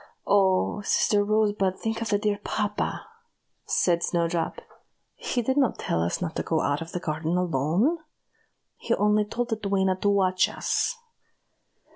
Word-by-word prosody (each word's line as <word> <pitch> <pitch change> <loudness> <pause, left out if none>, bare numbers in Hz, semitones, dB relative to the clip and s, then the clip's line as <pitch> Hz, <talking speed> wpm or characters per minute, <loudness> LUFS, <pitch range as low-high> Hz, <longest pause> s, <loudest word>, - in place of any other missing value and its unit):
"Oh! 195 0 +2
sister 205 0 +2
Rosebud, 205 -3 +1
think 225 0 -3
of 230 - -2
the 205 - +3
dear 205 -1 -1
papa!" 210 -1 -2 0.6
said 170 -2 +2
Snowdrop. 170 -1 -1 0.5
"He 245 - -2
did 265 +4 0
not 270 -5 +2
tell 80 - -1
us 85 - -1
not 160 - -4
to - - 0
go 160 -1 0
out 145 +2 0
of 165 - -7
the 180 - -3
garden 160 +2 -2
alone; 180 - +1 0.8
he - - 0
only 210 0 +2
told 240 +3 -3
the 225 - -1
duenna 195 -2 +1
to 205 - +1
watch 185 -2 +2
us. - - -1
200 Hz, 155 wpm, -26 LUFS, 170-215 Hz, 0.8 s, the